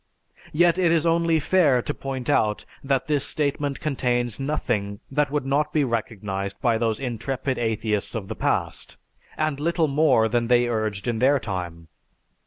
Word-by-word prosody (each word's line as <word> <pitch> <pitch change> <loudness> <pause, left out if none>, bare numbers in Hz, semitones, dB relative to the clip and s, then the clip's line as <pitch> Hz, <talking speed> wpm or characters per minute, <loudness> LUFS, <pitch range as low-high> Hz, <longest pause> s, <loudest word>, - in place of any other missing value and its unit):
Yet 175 +2 +3
it 175 -3 +3
is 165 -1 +2
only 165 -1 +2
fair 145 -6 +3
to 145 - -2
point 135 -3 -5
out 105 -1 +1 0.2
that 135 -1 0
this 145 -3 0
statement 145 -1 -1
contains 125 -5 -1
nothing 110 -8 -2
that 150 +1 +1
would 145 -1 -2
not 145 +3 +1
be 150 -1 +2
recognized 105 -5 -3
by 115 -3 +1
those 115 -2 0
intrepid 130 +1 -3
atheists 110 -2 -1
of 105 -4 -4
the 110 - -4
past, - - -2 0.4
and 155 -2 -1
little 165 +1 +1
more 140 -6 +3
than 115 +1 0
they 120 0 +4
urged 110 -2 -2
in 115 -2 -1
their 135 +3 +4
time. 90 -6 -5
130 Hz, 165 wpm, -24 LUFS, 110-150 Hz, 0.4 s, they